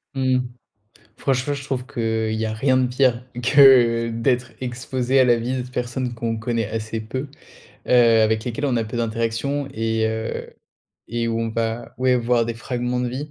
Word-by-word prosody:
Mmh. 130 -1 +2 0.8
Franchement, 135 +1 0
je 140 - -6
trouve 135 -2 -3
qu'il 110 -1 -1
y 110 0 -1
a 110 - -3
rien 130 +4 +2
de 130 -1 +2
pire 125 -2 +2 0.2
que 125 -4 +6
d'être 120 +1 0
exposé 130 +1 0
à - - +6
la 120 -1 +4
vie 120 +3 -2
d'autres 125 0 -5
personnes 125 0 -3
qu'on 115 -1 -2
connaît 115 -1 -2
assez 110 0 -4
peu, 130 +6 -5 0.6
heu, 115 -2 +5
avec 110 0 +1
lesquelles 125 +4 -2
on 130 -3 +1
a 115 - 0
peu 110 +2 -6
d'interactions 115 +5 -1
et, 110 0 0
heu, 110 0 -4 0.6
et 115 +1 -2
où 115 0 -1
on 115 - -1
va, 115 +1 -3
ouais, 130 0 +3
voir 120 0 +2
des 115 - -3
fragments 125 +1 -3
de 125 - -1
vie. 140 +5 -5
120 Hz, 185 wpm, -22 LUFS, 115-130 Hz, 0.8 s, que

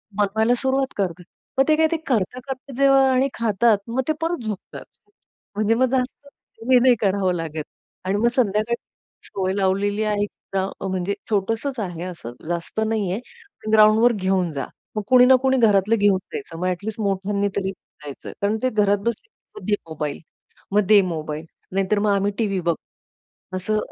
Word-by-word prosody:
बनवायला 220 +3 +2
सुरुवात 265 0 0
करतात. 180 -3 -2 0.3
मग 270 - +6
ते 310 - +5
काय 320 +1 +4
ते 330 - +1
करता-करता 255 +4 -2
जेव्हा 275 -1 +5
आणि 260 +1 +3
खातात 225 -1 +2
मग 245 +3 0
ते 310 - +2
परत 330 -6 -1
झोपतात. 210 -3 -6 0.7
म्हणजे 215 +2 +2
मग 255 +2 +3
जास्त 265 +2 -2 0.4
हे 250 - +8
नाही 250 -1 +5
करावं 195 -2 +2
लागत. 160 -2 -4 0.4
आणि 195 +2 +1
मग 235 +3 +3
संध्याकाळी 220 -1 +1 0.5
सवय 190 -1 -2
लावलेली 200 +2 +1
आहे 210 -1 0
एकतर 195 -1 -4
म्हणजे 190 +1 -1 0.2
छोटसंच 225 +6 -1
आहे 175 -4 -4
असं 170 -10 -7 0.2
जास्त 170 +5 -3
नाही 215 -5 0
आहे 245 - -8
ग्राउंडवर 220 +2 +6
घेऊन 190 -3 0
जा, 140 -2 -3 0.3
मग 215 - 0
कोणी 250 -1 +7
ना 260 +1 +7
कोणी 265 0 +3
घरातलं 215 -1 +4
घेऊन 205 -2 +3 0.2
जायचं 420 - -6
मग 185 - -1
ॲटलीस्ट 200 +5 -3
मोठ्यांनी 200 0 0
तरी 195 -1 -1
जायचं. 150 -6 -11
कारण 205 +2 +1
ते 255 - +3
घरात 205 -3 +2
बसले 235 - -2
ना, - - -62
"मग - - -12
दे 210 - +3
मोबाईल, 150 -2 -4 0.5
मग 210 +1 +4
दे 210 -2 +7
मोबाईल," 155 0 -5 0.3
नाहीतर 195 +2 +1
मग 210 0 +2
आम्ही 200 +1 +1
टीव्ही 200 -4 0
बघतो. 170 -2 -3 0.6
असं 215 +4 -1
210 Hz, 170 wpm, -22 LUFS, 190-240 Hz, 0.7 s, हे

